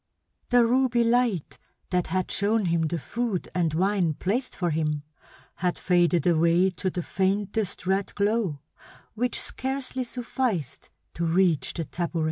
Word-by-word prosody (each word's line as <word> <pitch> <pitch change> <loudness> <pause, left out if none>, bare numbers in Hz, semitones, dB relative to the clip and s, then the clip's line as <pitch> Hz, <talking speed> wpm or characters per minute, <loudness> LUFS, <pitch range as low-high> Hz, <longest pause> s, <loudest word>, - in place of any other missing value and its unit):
The 245 -1 +5
ruby 245 0 +3
light 230 - +1 0.3
that 180 -1 +1
had 185 +2 -1
shown 210 +1 +2
him 165 -2 +1
the 170 - -2
food 225 - -3
and 170 -3 +1
wine 185 -3 +1
placed 230 - -2
for 175 -3 -1
him 150 -1 -1 0.5
had 180 0 0
faded 175 -1 +2
away 170 +2 +4
to 185 +1 -2
the 180 -1 -4
faintest 195 +1 -1
red 190 +1 0
glow 200 - 0 0.5
which 245 +2 -1
scarcely 265 -1 -2
sufficed 240 - -3 0.2
to 170 - -2
reach 170 -2 +2
the 165 - -2
tabouret. 170 +2 -3
185 Hz, 140 wpm, -26 LUFS, 170-230 Hz, 0.5 s, The